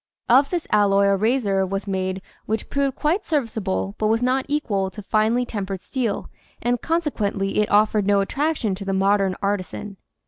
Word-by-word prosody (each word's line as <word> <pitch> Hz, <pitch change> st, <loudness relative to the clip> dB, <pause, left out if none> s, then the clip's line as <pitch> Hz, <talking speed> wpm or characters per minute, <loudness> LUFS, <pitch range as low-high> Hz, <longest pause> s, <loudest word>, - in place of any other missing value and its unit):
Of 270 Hz, +4 st, +5 dB
this 350 Hz, -3 st, -2 dB
alloy 200 Hz, -2 st, +4 dB
a 200 Hz, 0 st, +4 dB
razor 205 Hz, -2 st, +1 dB
was 195 Hz, +1 st, -3 dB
made 190 Hz, -1 st, -2 dB, 0.2 s
which 220 Hz, 0 st, -3 dB
proved 280 Hz, -2 st, 0 dB
quite 340 Hz, +7 st, 0 dB
serviceable 215 Hz, -, -1 dB
but 215 Hz, -, +1 dB
was 225 Hz, +2 st, +1 dB
not 260 Hz, +1 st, +1 dB
equal 210 Hz, -10 st, 0 dB
to 210 Hz, +2 st, -10 dB
finely 220 Hz, +5 st, +1 dB
tem 205 Hz, -5 st, -4 dB
pered 195 Hz, -1 st, -4 dB
steel 235 Hz, -1 st, -2 dB, 0.3 s
and 245 Hz, +1 st, 0 dB
consequently 215 Hz, -13 st, -1 dB
it 210 Hz, -, +1 dB
offered 210 Hz, -1 st, +3 dB
no 200 Hz, -1 st, +4 dB
attraction 270 Hz, +1 st, 0 dB
to 195 Hz, +2 st, -6 dB
the 195 Hz, 0 st, -2 dB
modern 195 Hz, 0 st, +2 dB
artisan. 200 Hz, 0 st, -3 dB
210 Hz, 175 wpm, -23 LUFS, 195-250 Hz, 0.3 s, Of